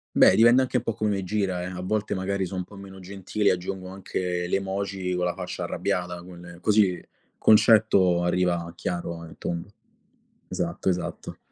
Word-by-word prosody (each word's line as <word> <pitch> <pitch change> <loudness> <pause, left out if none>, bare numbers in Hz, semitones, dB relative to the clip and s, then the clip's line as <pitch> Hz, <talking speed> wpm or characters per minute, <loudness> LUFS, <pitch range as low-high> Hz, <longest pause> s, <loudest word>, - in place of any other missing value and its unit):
Beh, - - +7
dipende 120 +3 +6
anche 130 -1 0
un 120 - -2
po' 115 - -1
come 105 0 -1
me 100 -2 -1
gira 95 -2 -1
eh, - - -4
a 90 0 -6
volte 105 +3 -1
magari 95 0 -1
so' 95 - -8
un 90 - -2
po' 100 - -15
meno 95 -1 -11
gentile 100 +2 -1
e - - +5
aggiungo 90 +1 -5
anche 90 -2 -3
le 90 - +1
emoji 95 -1 -3
con 90 - 0
la 90 - 0
faccia - - -5
arrabbiata, 90 -1 -2
quelle 85 -1 -12
così 100 -4 +3 0.4
concetto 105 -5 +5
arriva 85 -1 0
chiaro 85 -1 -4
e 80 - -11
tondo. 85 +4 -4 0.8
Esatto, - - -2
esatto. 90 -1 -4
95 Hz, 180 wpm, -25 LUFS, 90-100 Hz, 0.8 s, Beh